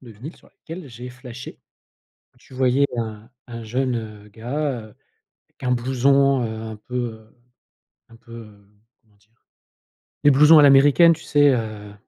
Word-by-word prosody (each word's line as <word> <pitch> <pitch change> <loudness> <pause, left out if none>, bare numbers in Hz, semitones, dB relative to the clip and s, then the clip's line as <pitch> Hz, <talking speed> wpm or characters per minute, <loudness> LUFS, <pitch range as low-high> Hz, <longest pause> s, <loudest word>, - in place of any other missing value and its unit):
de 120 -3 -14
vinyle 125 - -11
sur - - -23
laquelle 170 -5 -11
j'ai 120 +2 -10
flashé. 125 0 -11 0.8
Tu - - -18
voyais 130 +2 +2
un 110 -1 -6 0.2
un 115 -1 -9
jeune, 125 +2 -2
heu, 105 -2 -9
gars, 125 +3 -4
heu, 110 -1 -15 0.6
avec - - -20
un 125 - -1
blouson, 135 +2 +2
heu, 110 -1 -5
un 110 -1 -8
peu, 125 +4 -11 0.2
heu, 110 +2 -18 0.7
un 115 - -17
peu, 115 0 -18
hem, 100 -1 -22 0.2
comment 105 -2 -33
dire? 105 +2 -34 0.9
Les 145 - +6
blousons 150 +4 +6
à 150 - +6
l'américaine, 145 +5 +6
tu 160 - -11
sais, 145 -1 +3
heu, 110 -3 -5
125 Hz, 165 wpm, -21 LUFS, 110-140 Hz, 0.9 s, Les